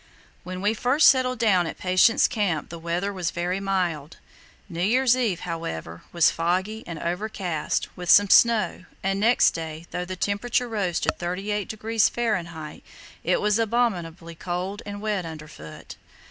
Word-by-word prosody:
When 185 +1 -6
we 210 +2 +2
first 255 +7 +3
settled 255 -1 +2
down 195 -7 +3
at - - -6
Patience 185 +5 +4
Camp 190 -8 -1
the 170 - -8
weather 175 +4 -2
was 180 -3 -2
very 175 +2 -2
mild. 180 -6 -2 0.5
New 170 -3 -5
Year's 245 +6 +3
Eve, 225 -9 -1
however, 85 - -5
was 170 -2 +4
foggy 185 +6 -1
and 170 -2 -6
overcast, 180 -2 -2
with 180 -1 -6
some 205 +3 +7
snow, 215 -4 +4 0.2
and 195 +1 0
next 230 +4 +4
day, 160 0 -6
though 180 - -3
the 185 +1 -5
temperature 210 +6 -1
rose 200 -7 -1
to - - +1
38° 210 +4 -1
Fahr., 170 -9 -3 0.4
it - - +1
was 210 +1 +2
"abominably 185 -8 -1
cold 180 +4 -4
and 205 0 -6
wet 210 -3 -1
underfoot." 155 - -10
185 Hz, 150 wpm, -24 LUFS, 170-215 Hz, 0.5 s, some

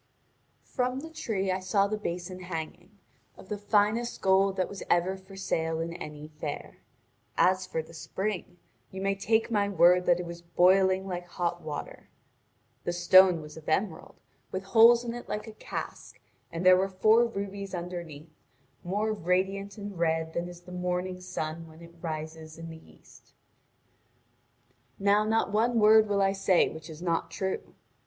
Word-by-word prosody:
From 255 +1 -2
the 320 +1 -9
tree 195 -11 -2
I 185 - -1
saw 190 +2 +2
the 210 +1 -1
basin 180 -2 -5
hanging, 175 +2 -7 0.4
of - - -14
the 210 - -2
finest 210 +3 +1
gold 190 0 +3
that 185 - +1
was 200 - -8
ever 175 +2 +2
for 190 +1 -14
sale 160 -4 -1
in 165 +1 -3
any 150 -3 -8
fair. 145 -2 -6 0.6
As 185 0 +3
for 160 -3 -2
the 165 - -15
spring, 185 +2 -4 0.3
you 190 - -8
may 195 +1 +1
take 220 +4 +1
my 205 -2 +2
word 180 -2 +5
that 175 0 +4
it 180 - -4
was 170 0 -8
boiling 185 +2 +3
like 175 -1 -5
hot 175 0 -2
water. 155 -1 -7 0.7
The 175 - -2
stone 175 0 +6
was 150 +1 -11
of 160 - -8
emerald, 180 +2 -1 0.4
with 185 +1 -3
holes 230 +4 +6
in 235 -1 -4
it 240 - -8
like 210 0 -3
a 220 - -8
cask, - - -7 0.3
and 170 +2 -4
there 185 0 +8
were 190 +1 +1
four 220 +5 +4
rubies 200 -3 -5
underneath, 170 -3 -7 0.5
more 210 +4 -1
radiant 195 +2 -1
and 205 -3 -7
red 160 -1 0
than 175 +1 -3
is 175 0 -11
the 180 +1 -13
morning 180 +1 -3
sun 165 -2 -5
when 160 0 -15
it 170 0 -13
rises 155 -1 -6
in 165 0 -8
the 160 - -13
east. 80 - -21 1.6
Now 200 +1 +3
not 220 -1 +1
one 230 +3 +2
word 215 0 +6
will 200 -1 +2
I 195 - +3
say 195 -2 +3
which 160 0 -10
is 160 +2 -9
not 170 -2 0
true. 190 -1 -4
185 Hz, 170 wpm, -28 LUFS, 170-200 Hz, 1.6 s, there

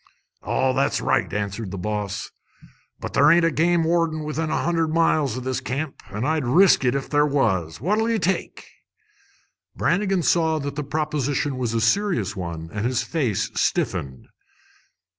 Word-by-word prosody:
"Oh, 130 -1 0
that's 70 - +1
all - - -7
right," - - +1
answered 105 0 -3
the 100 - -6
boss; 105 0 -4 0.7
"but - - -6
there 145 +1 +5
ain't 170 0 +5
a 165 - +2
game 170 +3 +2
warden 165 -1 0
within 155 +1 -3
a - - -1
hundred 165 -1 +1
miles 155 -5 +1
o' - - -4
this 130 0 -2
camp, 140 +3 -4
an' 105 +5 -3
I'd 155 0 0
risk 170 +7 +5
it 125 +1 +2
if 140 - -2
there 145 0 +2
was. 95 - 0
What'll 210 - +1
ye 230 - +1
take?" 190 0 -2 1.1
Brannigan 195 -2 +1
saw 160 -2 +2
that 140 -2 -4
the 150 - -3
proposal 145 -1 -1
was 125 -3 -2
a 115 - +1
serious 120 - +1
one, 85 -3 -6
and 105 -1 -3
his 125 -1 0
face 130 - -1
stiffened. 65 -2 -1
145 Hz, 170 wpm, -23 LUFS, 115-165 Hz, 1.1 s, there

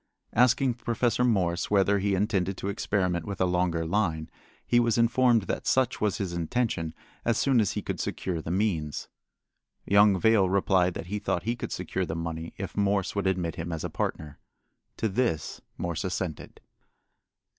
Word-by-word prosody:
Asking 125 +2 +4
Professor 120 0 0
Morse 90 -7 +1
whether 100 0 +3
he 100 0 +1
intended 95 -2 0
to 100 - -3
experiment 90 -4 0
with 100 +2 -6
a 95 - +3
longer 90 -2 0
line, 80 -4 -1 0.3
he 120 - +3
was 120 -1 +2
informed 115 -1 +4
that - - -4
such 130 -1 +2
was 105 -1 +1
his 95 -5 -3
intention 85 -2 -1 0.3
as 115 -1 +1
soon 130 -4 +3
as 105 -1 0
he 105 - -3
could - - -4
secure 85 -4 -3
the 80 - -7
means. 85 -6 -1 0.8
Young 100 -1 +5
Vail 105 -2 +4
replied 95 -2 +2
that - - -5
he 105 +4 -3
thought 90 -4 -1
he 115 +2 -1
could - - -6
secure 95 - -2
the 80 - -3
money 85 0 -5
if 95 -1 -6
Morse 100 -1 +1
would 100 -1 0
admit 90 -3 -1
him 85 +1 -4
as 80 -2 -4
a - - -4
partner. 75 -1 -4 0.6
To 110 - 0
this 110 - -1 0.2
Morse 85 -2 -3
assented. 90 -3 -4
95 Hz, 175 wpm, -27 LUFS, 85-110 Hz, 0.8 s, Young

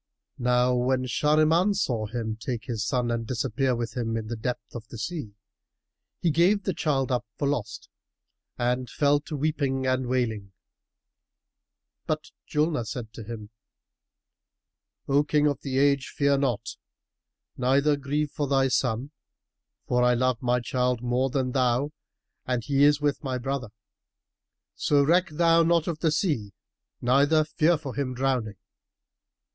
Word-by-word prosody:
Now 125 0 +3
when 130 +1 +1
Shahriman 155 - +3
saw 120 - -1
him 110 -1 -3
take 120 +1 -5
his 115 -5 -3
son 120 0 0
and 115 -1 -2
disappear 130 +1 0
with 115 -1 -4
him 115 -2 -1
in 110 -1 -5
the 115 - -3
depth 120 +2 -5
of 110 -2 -8
the 115 - -9
sea, 110 - -5 0.8
he 170 - +2
gave 185 +6 +3
the 190 - -1
child 135 -5 0
up 125 -2 0
for 145 - 0
lost 115 -7 -3 0.7
and 125 0 -1
fell 145 +3 +2
to 150 +1 -7
weeping 140 -3 -1
and 130 -1 0
wailing; 110 -6 -1 1.5
but 155 0 -2 0.2
Julnar 150 -5 0
said 110 -1 -6
to - - -8
him, 110 -1 -8 1.6
"O 140 +1 +3
King 150 0 +2
of 145 -2 0
the 130 -2 -3
Age, 140 -1 +3
fear 140 -1 +2
not, 120 -5 -1 0.8
neither 140 +4 +3
grieve 145 +1 -2
for 145 -1 -2
thy 135 -1 +2
son, 125 +2 0 0.8
for 125 0 +2
I 125 0 +4
love 130 -1 +1
my 125 -1 +1
child 125 0 -1
more 125 +2 +1
than 130 -1 -1
thou 130 +2 +1 0.6
and 125 -2 0
he 140 +3 +3
is 145 0 +4
with 145 +1 0
my 130 -2 -2
brother, 130 -2 -3 1.0
so 145 -1 +2
reck 175 +5 +3
thou 165 +2 +4
not 165 -1 +3
of 165 -3 -2
the 160 - +2
sea 145 - -1 0.5
neither 140 +5 +4
fear 155 +2 +2
for 145 -4 -7
him 130 -3 -3
drowning. 125 -6 -1
130 Hz, 150 wpm, -26 LUFS, 120-145 Hz, 1.6 s, I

